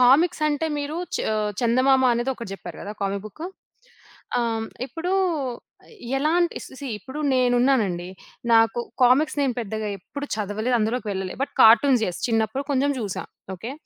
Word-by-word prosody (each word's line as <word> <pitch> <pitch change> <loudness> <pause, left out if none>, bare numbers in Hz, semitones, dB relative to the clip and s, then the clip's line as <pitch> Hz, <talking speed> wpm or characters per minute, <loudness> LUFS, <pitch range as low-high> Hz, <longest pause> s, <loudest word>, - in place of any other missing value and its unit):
Comics 305 +7 +5
అంటే 300 +2 0
మీరు 290 +2 -3 0.2
చ - - +2 0.2
ఆహ్, 215 -1 0
చందమామ 255 +3 +4
అనేది 240 +3 0
ఒకటి 230 -5 -7
చెప్పారు 195 - -9
గదా! 205 - -6
కామికు 200 0 -1
బుక్కు 310 - -7 0.9
ఆ! - - +2
హ్మ్. 225 0 -3 0.2
ఇప్పుడు 330 +7 -3 1.1
ఎలాంటి 335 +4 +2 0.3
సీ, 280 - -5
ఇప్పుడు 260 +7 -9 0.2
నేనున్నానండి. 245 -8 +2 0.4
నాకు 225 +1 +4 0.2
కామిక్స్ 265 +5 +4
నేను 265 -3 +1
పెద్దగా 220 -1 -3
ఎప్పుడు 285 +10 -7
చదవలేదు. 215 +4 0
అందులోకి 225 +2 -1
వెళ్ళలే. 190 -1 -4
బట్ 275 - -3
కార్టూన్స్ 235 +2 +6
యెస్ 180 - -4
చిన్నప్పుడు 225 +4 0
కొంచెం 280 +1 +2
చూసా. 205 -4 -4 0.3
ఓకే. 230 +8 -6
245 Hz, 145 wpm, -24 LUFS, 215-275 Hz, 1.1 s, కార్టూన్స్